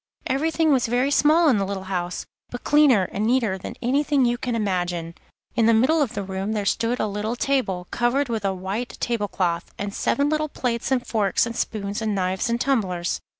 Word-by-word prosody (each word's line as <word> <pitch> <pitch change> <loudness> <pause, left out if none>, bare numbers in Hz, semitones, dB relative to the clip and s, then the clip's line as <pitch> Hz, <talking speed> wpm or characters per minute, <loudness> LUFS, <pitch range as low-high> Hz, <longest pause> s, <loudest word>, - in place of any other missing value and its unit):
Everything 315 +4 +1
was 255 -3 +2
very 250 +4 +1
small 315 +4 +4
in 245 -8 +4
the - - +1
little 195 -1 -4
house, 180 -2 -3 0.2
but 245 - -7
cleaner 290 -9 +5
and 205 - -2
neater 230 -5 +2
than - - -7
anything 275 +2 +2
you 240 0 +2
can 240 0 -3
imagine. 175 -5 -2 0.4
In 225 -1 +3
the 230 - +5
middle 290 +8 +3
of 245 -4 -1
the 200 - -2
room 195 +2 -3
there 210 -2 -2
stood 230 +5 0
a - - +1
little 210 +3 -3
table, 235 -9 0
covered 245 +4 +1
with 225 -3 -3
a 195 - +1
white 190 +6 -4
tablecloth, 195 -7 -1
and 200 0 -4
seven 280 +6 +1
little 305 0 0
plates 235 -4 -2
and 250 -2 +1
forks 210 -2 +1
and 235 0 -5
spoons 205 -2 -3
and 215 -2 -1
knives 185 +3 -1
and 235 0 0
tumblers. 190 -10 0
230 Hz, 200 wpm, -23 LUFS, 195-260 Hz, 0.4 s, cleaner